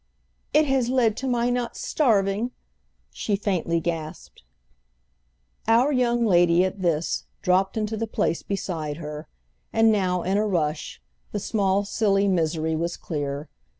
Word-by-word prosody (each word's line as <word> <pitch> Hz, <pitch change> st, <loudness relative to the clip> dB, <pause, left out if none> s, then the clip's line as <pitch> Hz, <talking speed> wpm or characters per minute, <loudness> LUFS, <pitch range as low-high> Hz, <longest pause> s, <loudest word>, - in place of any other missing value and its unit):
"It 305 Hz, +1 st, +4 dB
has 265 Hz, -4 st, +1 dB
led 240 Hz, -4 st, +2 dB
to 270 Hz, -, -3 dB
my 245 Hz, -1 st, +1 dB
not 245 Hz, -1 st, -2 dB
starving!" 215 Hz, -4 st, +1 dB, 0.6 s
she 205 Hz, -, -1 dB
faintly 180 Hz, -5 st, 0 dB
gasped. 165 Hz, -2 st, -5 dB, 1.3 s
Our 235 Hz, +6 st, +4 dB
young 240 Hz, -3 st, +2 dB
lady, 175 Hz, -2 st, +4 dB
at 190 Hz, +1 st, -4 dB
this, 165 Hz, -2 st, 0 dB, 0.2 s
dropped 190 Hz, +2 st, +2 dB
into 215 Hz, 0 st, -1 dB
the 225 Hz, +1 st, -2 dB
place 170 Hz, -5 st, -1 dB
beside 160 Hz, -7 st, -3 dB
her, 150 Hz, -1 st, -7 dB, 0.4 s
and 225 Hz, 0 st, +4 dB
now, 185 Hz, -4 st, +1 dB
in 190 Hz, +2 st, +1 dB
a 215 Hz, -, +1 dB
rush, 155 Hz, -5 st, -2 dB, 0.3 s
the 205 Hz, -, -2 dB
small 200 Hz, -1 st, +1 dB
silly 200 Hz, -1 st, +2 dB
misery 160 Hz, -3 st, 0 dB
was 170 Hz, +2 st, -2 dB
clear. 145 Hz, -1 st, -4 dB
195 Hz, 140 wpm, -25 LUFS, 170-225 Hz, 1.3 s, It